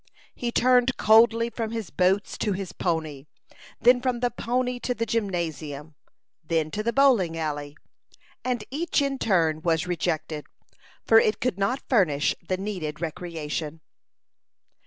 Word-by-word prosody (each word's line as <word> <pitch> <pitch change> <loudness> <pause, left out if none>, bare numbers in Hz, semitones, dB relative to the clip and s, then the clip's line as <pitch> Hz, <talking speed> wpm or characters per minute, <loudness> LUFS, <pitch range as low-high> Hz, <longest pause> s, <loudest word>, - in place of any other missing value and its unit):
He 240 -1 -3
turned 250 +1 +3
coldly 230 +1 +5
from 225 -2 -3
his 225 -5 -5
boats 185 +5 +1
to 210 - 0
his 190 -1 -5
pony; 155 -5 -3 0.5
then 245 +1 +5
from 250 -2 -1
the 245 0 0
pony 250 +2 -1
to 250 +1 -2
the 230 - -1
gymnasium; 160 -9 -3 0.5
then 160 -1 -1
to 210 - -2
the 235 +2 0
bowling 235 -12 +3
alley; 145 -2 -4 0.7
and 245 -4 -1
each 315 +4 0
in 275 -1 -1
turn 165 -6 +1
was 165 0 +1
rejected, 160 -3 -2 0.6
for 225 - +7
it 215 -2 +1
could 225 -6 -1
not 250 +7 -1
furnish 170 - +2
the 185 +1 -2
needed 180 -7 -4
recreation. 160 -2 -4
195 Hz, 140 wpm, -25 LUFS, 160-235 Hz, 0.7 s, for